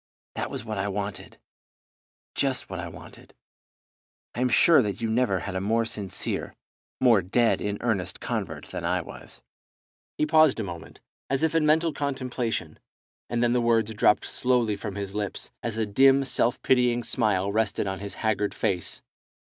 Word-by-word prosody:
That - - -3
was - - -5
what 110 -3 -4
I 100 - -1
wanted, 100 0 -5 1.0
just 135 -7 -1
what 95 - -4
I 85 - -4
wanted. 85 - -13 1.0
I 120 - -3
am 125 - +2
sure 160 +4 +6
that 100 -4 -3
you 115 - -1
never 110 -5 +1
had 100 - -5
a 95 - -1
more 115 +3 +1
sincere, 100 -4 -3 0.4
more 115 -6 +5
dead 115 +6 +2
in 105 0 -2
earnest 105 -7 -1
convert - - -4
than - - -5
I - - +1
was." - - -11 0.7
He - - +2
paused 155 -4 +4
a - - -1
moment, 85 -4 -9 0.3
as 135 +3 0
if 160 - +2
in 160 -2 +2
mental 160 +1 +3
contemplation, 125 - -3 0.5
and 120 0 0
then 120 0 +3
the 125 - +2
words 115 -2 +2
dropped 105 0 +3
slowly 125 -4 +1
from 100 0 -6
his 100 -1 -5
lips, 105 -2 -4
as 115 -2 -3
a 110 - +1
dim 135 +6 +5
self 125 -2 +1
pitying 125 -2 +3
smile 100 -5 +1
rested 105 -1 0
on 95 -1 -3
his 100 0 -6
haggard 105 -2 -1
face. 90 -3 -2
110 Hz, 170 wpm, -26 LUFS, 100-125 Hz, 1.0 s, sure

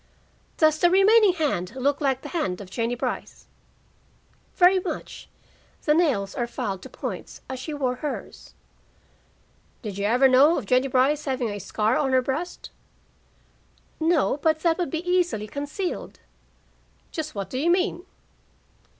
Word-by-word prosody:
"Does 310 -1 +3
the 350 - +5
remaining 395 +2 +5
hand 260 - -2
look 280 +3 0
like 270 -2 0
the - - -7
hand 190 - -2
of 190 -2 -10
Jennie 230 +3 -1
Brice?" 245 - -5 1.1
"Very 370 +1 +5
much. - - -6 0.5
The 300 - +3
nails 270 - +1
are 240 - -2
filed 195 -5 -4
to - - -10
points, - - -7
as 260 -1 -5
she 285 +5 -6
wore 255 -3 -1
hers." 295 +2 -7 1.3
"Did 200 -3 -5
you 200 - -1
ever 245 +5 +5
know 275 +6 +5
of 255 - -4
Jennie 255 +5 +2
Brice 270 +4 +2
having 255 -5 -1
a 205 - -5
scar 215 +4 0
on 270 -3 0
her 260 - +5
breast?" 310 +8 -4 1.3
"No, 320 -3 +2
but 315 +1 +1
that 335 +1 +2
would 350 - -1
be 325 +5 -4
easily 355 - +1
concealed." 290 - -5 0.9
"Just 310 -4 -5
what 195 -2 -5
do 255 - -2
you 325 +5 +1
mean?" 360 0 +1
275 Hz, 150 wpm, -25 LUFS, 245-330 Hz, 1.3 s, the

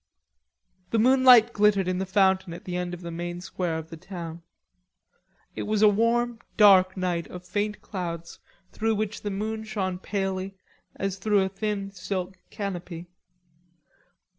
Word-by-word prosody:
The 230 - 0
moonlight 250 -1 +6
glittered 205 -3 +3
in 185 0 0
the 190 - -2
fountain 190 -2 +2
at - - -12
the 180 - -4
end 180 0 -2
of 175 - -13
the 170 -1 -6
main 175 +1 -5
square 180 -2 -3
of 160 +1 -8
the 165 - -7
town. 170 -2 -8 1.1
It - - -4
was 215 0 +1
a - - +9
warm 230 +3 +2 0.2
dark 190 -3 +6
night 180 -2 -1
of 180 0 -10
faint 210 +1 -2
clouds 170 -4 -6 0.3
through 225 0 0
which 215 0 -3
the 205 - -3
moon 215 +2 -3
shone 190 -4 -3
palely 195 -1 -3 0.4
as 195 -1 -3
through 205 0 +2
a 190 - -1
thin 200 0 -3
silk 185 -1 -4
canopy. 180 -4 -6
190 Hz, 155 wpm, -26 LUFS, 180-210 Hz, 1.1 s, a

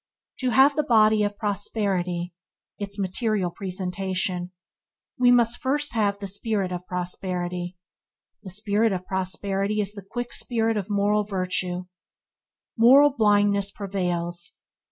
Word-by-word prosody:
To 255 - 0
have 270 +4 +5
the 305 - +3
body 220 -5 +4
of 205 0 -1
prosperity 190 -4 -1 0.2
– - - -54
its 200 0 -5
material 195 -1 -1
presentation 185 -1 -3 0.3
– - - -48
we 250 -1 +5
must 240 -1 +3
first 290 +2 0
have 205 -3 +1
the 200 - -6
spirit 200 -1 -2
of 180 0 -5
prosperity, 180 0 -3 0.6
and 190 - -9
the - - -10
spirit 210 +2 +1
of 180 -1 -4
prosperity 195 +2 -1
is 205 -1 0
the 200 - -8
quick 240 +5 -6
spirit 225 -2 +1
of 205 -1 -3
moral 205 +1 +2
virtue. 185 -2 -2 0.9
Moral 270 +5 +7
blindness 205 -3 +3
prevails. 180 -3 -3
200 Hz, 135 wpm, -25 LUFS, 185-220 Hz, 0.9 s, Moral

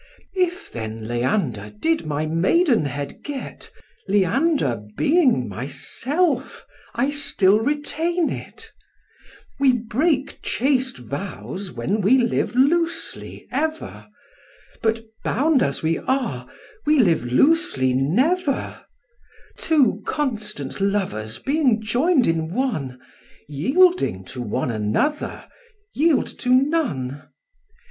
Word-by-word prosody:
If, 365 +1 -1
then, 110 -1 -6
Leander 120 - -1
did 325 - 0
my 150 +1 -1
maidenhead 165 - +1
git, 285 -3 -7 0.4
Leander 200 - +1 0.2
being 280 - +3
myself, 250 - -2 0.3
I 275 +1 +1
still 210 -8 +3
retain 310 +6 -1
it: - - -8 0.9
We 275 -2 +5
break 260 +5 0
chaste 260 0 0
vows 185 - -6
when 205 +3 -1
we 220 +8 +5
live 240 -1 0
loosely 330 +5 0
ever, 315 +3 -3 0.7
But 225 0 0 0.2
bound 285 +1 +2
as 140 - -1
we 160 +1 +1
are, 260 -2 -2 0.4
we 305 0 +4
live 175 - +3
loosely 130 - +2
never: 260 - 0 0.8
Two 300 -6 +2
constant 210 - -3
lovers 190 - -1
being 270 -5 +1
join'd 250 +7 +2
in 165 0 0
one, 155 - -2 0.5
Yielding 190 - +2
to 125 - -5
one 120 +2 -2
another, 110 - -1 0.5
yield 310 +1 +3
to 250 - -3
none. 255 - +1
235 Hz, 100 wpm, -22 LUFS, -, 0.9 s, We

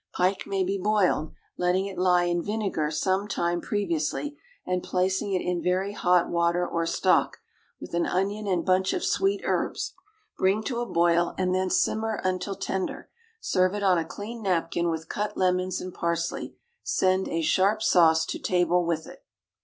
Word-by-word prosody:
Pike 185 +2 0
may 195 -1 0
be 195 +2 -1
boiled, 190 -6 +1 0.3
letting 180 +2 +1
it 200 -1 -6
lie 180 -1 +3
in 175 0 0
vinegar 200 -7 -1
some 190 +6 0
time 175 -4 -1
previously, 200 - -2 0.3
and 180 0 -1
placing 190 +3 0
it 185 - 0
in 180 -1 -1
very 190 +3 0
hot 180 -3 +3
water 170 +1 +1
or 165 0 -1
stock, - - +2 0.4
with - - -10
an 170 0 +1
onion 200 +3 -1
and 180 -3 0
bunch 185 0 +2
of 360 - -2
sweet 390 +1 +1
herbs. - - -1 0.5
Bring 195 +3 +2
to 240 0 -2
a 240 - -2
boil, 170 -1 +2
and 185 -1 0
then 185 0 0
simmer 220 +2 0
until 185 +1 -1
tender. 190 0 -4 0.3
Serve 185 - +1
it 205 - -3
on 185 -3 +4
a - - -1
clean 205 +9 -8
napkin 170 -3 0
with 160 0 -3
cut 210 +4 -3
lemons 185 0 +1
and 185 -1 -7
parsley; 170 0 -2 0.3
send 185 0 +1
a 165 0 -1
sharp 200 +6 +2
sauce 160 -5 +4
to - - -4
table 180 -1 +2
with 165 -2 -1
it. - - -13
185 Hz, 175 wpm, -26 LUFS, 170-195 Hz, 0.5 s, on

